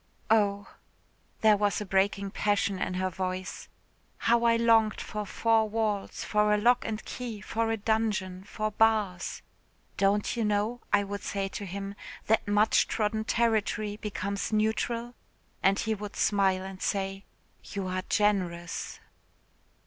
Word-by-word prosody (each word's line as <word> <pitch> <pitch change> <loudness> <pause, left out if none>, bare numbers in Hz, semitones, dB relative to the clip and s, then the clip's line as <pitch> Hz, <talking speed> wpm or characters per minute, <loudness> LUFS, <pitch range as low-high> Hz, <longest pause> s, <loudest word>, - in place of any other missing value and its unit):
Oh," 205 -2 +3 0.7
there 215 -1 +6
was 205 0 +1
a 210 - -4
breaking 195 +1 +1
passion 200 -2 0
in 185 - -1
her 185 0 -1
voice 185 0 -4 0.5
"how 235 0 +2
I 230 0 +5
longed 225 -2 +4
for 210 -1 -5
four 225 0 +2
walls, 210 -2 -2
for 210 0 +2
a - - +1
lock 240 +4 +3
and 220 -1 -4
key, 235 -4 -5
for 225 +3 -1
a 225 - 0
dungeon, 210 -4 -1
for 215 +1 -3
bars. 210 -4 +1 0.5
'Don't 200 +3 +2
you 230 - 0
know,' 210 +3 0
I 205 0 +4
would 200 0 -5
say 195 -1 -2
to 200 +1 -6
him, 195 +2 -5 0.3
'that 220 -1 +2
much 205 +1 +3
trodden 220 0 -1
territory 215 -2 +1
becomes 200 -1 -3
neutral?' 225 +2 0 0.5
and 195 +1 +3
he 220 - 0
would 210 -1 -6
smile 195 -2 +2
and 190 -1 -8
say, 195 0 -2 0.4
'you 200 -2 -5
are 185 0 -2
generous.'" 180 -5 0
210 Hz, 145 wpm, -29 LUFS, 195-220 Hz, 0.7 s, there